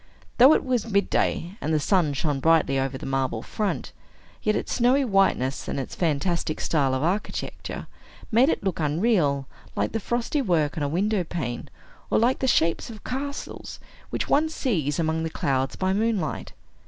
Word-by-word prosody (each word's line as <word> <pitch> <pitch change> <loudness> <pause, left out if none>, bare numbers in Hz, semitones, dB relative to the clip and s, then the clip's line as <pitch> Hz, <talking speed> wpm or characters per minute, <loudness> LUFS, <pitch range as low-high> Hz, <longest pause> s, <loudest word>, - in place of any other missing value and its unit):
Though 265 +5 +9
it - - -1
was 245 -3 0
midday, 200 -2 +1
and 155 - -1
the 155 - +3
sun 165 -2 +2
shone 145 0 -1
brightly 160 -3 +3
over 135 0 -2
the - - -8
marble 130 -4 -1
front, 210 -2 -3 0.5
yet 215 0 +1
its - - -2
snowy 260 +3 +3
whiteness, 195 - +1
and - - -2
its 130 - -5
fantastic 165 0 -1
style 140 -5 +1
of 130 - -1
architecture, 185 +6 -3 0.5
made 240 +6 +5
it - - -1
look 190 -4 -1
unreal, 150 -3 +1 0.3
like - - 0
the 225 - -1
frost 240 +6 -2
work 175 - +1
on 160 - -3
a 145 - 0
window 195 +4 +1
pane, 140 -8 -4 0.4
or - - +2
like 245 +4 +2
the 265 - 0
shapes 165 -5 +2
of 215 -3 -10
castles 280 +3 -5 0.3
which - - -2
one 310 +2 +3
sees 175 - -1
among 160 -1 0
the 160 - -2
clouds 135 -3 -1
by 190 0 0
moonlight. 210 -6 -1
175 Hz, 175 wpm, -25 LUFS, 145-225 Hz, 0.5 s, Though